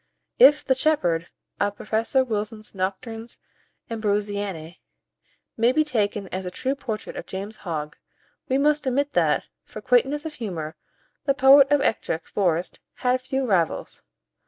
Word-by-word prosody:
If 295 -11 +7
"the 265 - +4
shepherd" 180 - +1 0.3
of 205 0 0
Professor 225 +6 +1
Wilson's 215 -2 -4
"Noctes 225 +5 -4 0.5
Ambrosianae" 205 -6 -2 0.8
may 230 +2 +4
be 310 +4 +3
taken 210 -8 -1
as 190 +1 -4
a 180 - -4
true 260 +9 -2
portrait 225 -6 -5
of - - -7
James 200 +3 -6
Hogg, 150 -5 -5 0.5
we 260 - +2
must 295 0 +2
admit 280 +3 +1
that, - - +2 0.2
for - - -10
quaintness 295 - +2
of 315 - -5
humour, 175 - -5 0.5
the 275 - +2
poet 275 0 +7
of 290 -1 +3
Ettrick 165 -9 -1
Forest 175 -3 -1 0.2
had 250 0 +1
few 265 +1 -2
rivals. 185 -8 0
225 Hz, 140 wpm, -24 LUFS, 190-270 Hz, 0.8 s, If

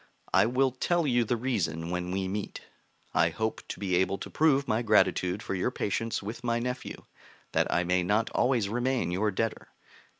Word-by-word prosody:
I 95 +3 +5
will 130 +2 +2
tell 170 +6 0
you 120 -3 +3
the 120 +2 0
reason 85 -10 -2
when 90 0 -2
we 95 +1 -1
meet. 100 +1 -4 0.5
I 85 0 +4
hope 110 +7 -2
to - - -6
be 95 -3 0
able 95 +1 +1
to - - -8
prove 140 -3 +3
my 110 +2 +1
gratitude 105 -3 +2
for - - -3
your 95 +5 0
patience 115 -2 -2
with 115 +4 -6
my 115 -1 +1
nephew, 125 +2 -4 0.5
that - - +1
I 85 - +2
may 90 +1 +2
not 105 +5 +1
always 120 -5 +2
remain 120 -3 0
your 100 +4 +1
debtor. 110 +3 -2
110 Hz, 190 wpm, -29 LUFS, 95-120 Hz, 0.5 s, I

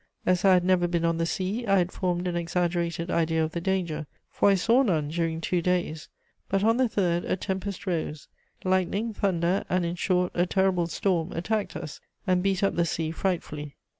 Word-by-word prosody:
As 180 0 +2
I 195 -1 +6
had 180 - +3
never 180 -1 +3
been 170 -1 0
on 165 0 +1
the 165 - +1
sea, 195 +7 -2
I 195 0 +4
had 180 0 +1
formed 180 -1 -1
an 175 - -2
exaggerated 170 0 -1
idea 160 -1 +1
of 160 - -2
the 170 - -4
danger, 170 -5 -1 0.2
for - - +3
I 200 - +5
saw 230 +7 +4
none 160 - +1
during 165 0 -1
two 175 +1 0
days. 175 -3 -1 0.4
But, 195 0 +1
on 225 +2 +4
the 255 -2 +2
third, 175 -5 +1
a - - 0
tempest 190 +1 -4
rose; 160 -5 -3 0.4
lightning, 190 +4 0
thunder 185 -2 +1
and, 180 -1 +1
in 170 - -1
short, 180 0 +1
a 175 +1 +1
terrible 190 -2 +2
storm 170 -2 0
attacked 210 +5 -2
us 155 -4 -7 0.2
and 185 -2 +2
beat 195 0 0
up 195 - +2
the 170 - +2
sea 160 0 -2
frightfully. 150 -5 -3
180 Hz, 200 wpm, -27 LUFS, 170-190 Hz, 0.4 s, I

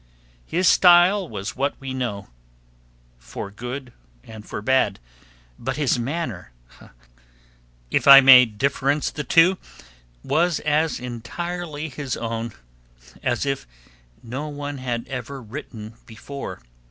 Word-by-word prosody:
His 180 +2 +1
style 180 +1 +5
was 100 +2 -6
what 140 +2 -2
we 135 -1 -6
know, 110 -6 -4 0.9
for - - -8
good 125 +4 -7 0.3
and 110 -2 -11
for - - -6
bad, 130 -5 +1 0.6
but 130 +4 -4
his 140 -4 +1
manner, 145 - -4 1.4
if - - 0
I 140 0 +12
may 130 -2 +9
difference 140 +6 -1
the 150 - -5
two, 175 +4 +4 0.6
was 170 0 +1
as 155 +1 0
entirely 155 +6 -5
his 135 -2 -5
own 115 -1 -4 0.7
as 125 +1 -1
if 135 - -3 0.6
no 130 +6 -5
one 145 -1 -6
had 120 -2 -4
ever 135 +1 -6
written 115 -2 -9
before. 135 - -8
135 Hz, 115 wpm, -22 LUFS, 120-150 Hz, 1.4 s, I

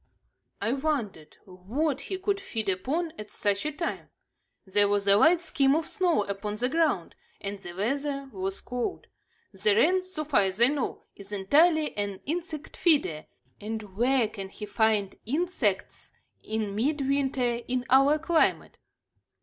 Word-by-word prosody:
I 230 - 0
wondered 260 - -3
what 240 - -2
he 380 - -4
could 395 +1 -1
feed 225 - -3
upon 300 - -1
at 210 - -7
such 205 +6 0
a - - -1
time. 335 +3 -4 0.6
There 205 +1 +2
was 200 0 0
a 200 - +7
light 325 - +5
skim 275 -5 +2
of 320 0 0
snow 355 - +1
upon 200 +1 -4
the 245 +4 0
ground, 310 - 0 0.2
and 200 0 -5
the 175 -3 -9
weather 275 +8 -2
was 190 0 -3
cold. 245 +8 -4 0.5
The 200 +1 +1
wren, 355 - +4
so 370 -4 -5
far 295 -6 +3
as 190 +1 -1
I 240 +2 +8
know, 285 -3 -3
is 200 0 -10
entirely 300 - +3
an 200 -2 -3
insect 320 -1 -5
feeder, 280 - +2 0.3
and 210 -2 -6
where 245 +1 +3
can 195 -3 -8
he 210 - -8
find 210 -2 +1
insects 275 - -1 0.3
in 215 -2 -3
midwinter 265 -1 0
in 250 0 -1
our 275 +3 +6
climate? 325 +1 +1
245 Hz, 150 wpm, -27 LUFS, 205-305 Hz, 0.6 s, I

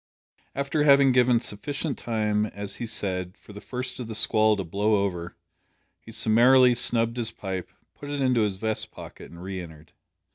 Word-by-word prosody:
After 140 +2 -1
having 140 -2 +5
given 125 -1 +3
sufficient 140 +6 -4
time, 105 -2 -1
as 100 -1 -7
he 120 - -5
said, 95 -4 -4
"for 105 - -15
the 105 - -10
first 125 0 -5
o' - - -4
the 110 -1 -7
squall 110 0 +4
to 95 - -3
blow 100 +5 0
over," 90 -3 -5 0.6
he 115 - -14
summarily 120 +3 +5
snubbed 115 -1 +3
his 115 -2 0
pipe, 95 -4 -6 0.2
put 145 - -10
it 145 0 -3
into 130 -3 +2
his 105 -3 0
vest 110 +2 -3
pocket, - - -12
and 85 +1 -12
re 95 -1 -5
entered. 80 -2 -13
110 Hz, 180 wpm, -25 LUFS, 100-125 Hz, 0.6 s, having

